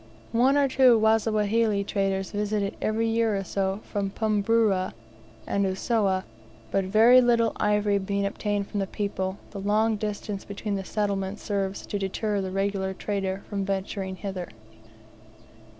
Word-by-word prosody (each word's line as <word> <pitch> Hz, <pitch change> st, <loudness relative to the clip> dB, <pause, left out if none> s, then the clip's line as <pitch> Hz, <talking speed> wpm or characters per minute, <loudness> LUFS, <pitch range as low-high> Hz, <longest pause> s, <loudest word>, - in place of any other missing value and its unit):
One 255 Hz, +5 st, +4 dB
or 285 Hz, -1 st, +4 dB
two 255 Hz, -3 st, +5 dB
Wasawahili 220 Hz, -1 st, +2 dB
traders 195 Hz, -1 st, -1 dB
visit 210 Hz, 0 st, -1 dB
it 200 Hz, -, -2 dB
every 225 Hz, +1 st, 0 dB
year 225 Hz, -2 st, +1 dB
or 195 Hz, -, -2 dB
so 195 Hz, +1 st, -2 dB
from 200 Hz, -2 st, -2 dB
Pumburu 210 Hz, -2 st, +1 dB, 0.5 s
and 200 Hz, -, 0 dB
Usowa; 190 Hz, 0 st, +1 dB, 0.5 s
but 195 Hz, -1 st, +1 dB
very 225 Hz, +6 st, +6 dB
little 235 Hz, -2 st, +3 dB
ivory 210 Hz, -1 st, +2 dB
being 200 Hz, +1 st, -1 dB
obtained 205 Hz, 0 st, -1 dB
from 205 Hz, -, -3 dB
the 195 Hz, -, -1 dB
people, 190 Hz, -1 st, -3 dB
the 200 Hz, -, -6 dB
long 215 Hz, +2 st, +2 dB
distance 205 Hz, -1 st, -4 dB
between 205 Hz, +1 st, -5 dB
the 195 Hz, -1 st, -2 dB
settlements 200 Hz, 0 st, -2 dB
serves 195 Hz, -1 st, -2 dB
to 205 Hz, -, -3 dB
deter 200 Hz, +1 st, -1 dB
the 190 Hz, -, -3 dB
regular 195 Hz, 0 st, -1 dB
trader 195 Hz, -1 st, -3 dB
from 200 Hz, -2 st, -2 dB
venturing 190 Hz, 0 st, -3 dB
hither. 190 Hz, -2 st, -5 dB
205 Hz, 150 wpm, -26 LUFS, 195-215 Hz, 0.5 s, very